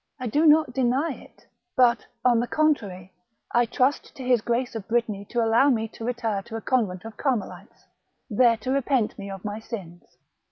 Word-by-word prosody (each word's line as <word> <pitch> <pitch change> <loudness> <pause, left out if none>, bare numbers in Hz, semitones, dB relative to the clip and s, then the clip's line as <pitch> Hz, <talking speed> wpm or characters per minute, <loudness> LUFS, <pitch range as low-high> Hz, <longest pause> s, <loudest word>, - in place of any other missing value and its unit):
" - - -48
I 255 - -4
do 295 +8 +2
not 305 -4 +5
deny 265 +5 +1
it; - - -17 0.3
but, 240 -2 +3 0.2
on 240 -2 +5
the 240 - -1
contrary, 200 - 0 0.4
I 240 0 +3
trust 255 +5 0
to 265 - -8
his 250 -3 +3
Grace 240 +2 -1
of 220 -4 -6
Brittany 220 -4 -1
to 235 +2 -1
allow 230 +5 +4
me 225 -4 +1
to 225 - -11
retire 230 -4 -2
to 225 +3 -9
a 225 - -4
convent 215 -7 -1
of 225 -1 -9
Carmelites, 255 -8 -3 0.4
there 230 0 +3
to 255 +4 -4
repent 270 -6 0
me 200 0 -6
of 195 0 -8
my 210 +1 -4
sins." 185 -7 -9
235 Hz, 195 wpm, -25 LUFS, 215-255 Hz, 0.4 s, not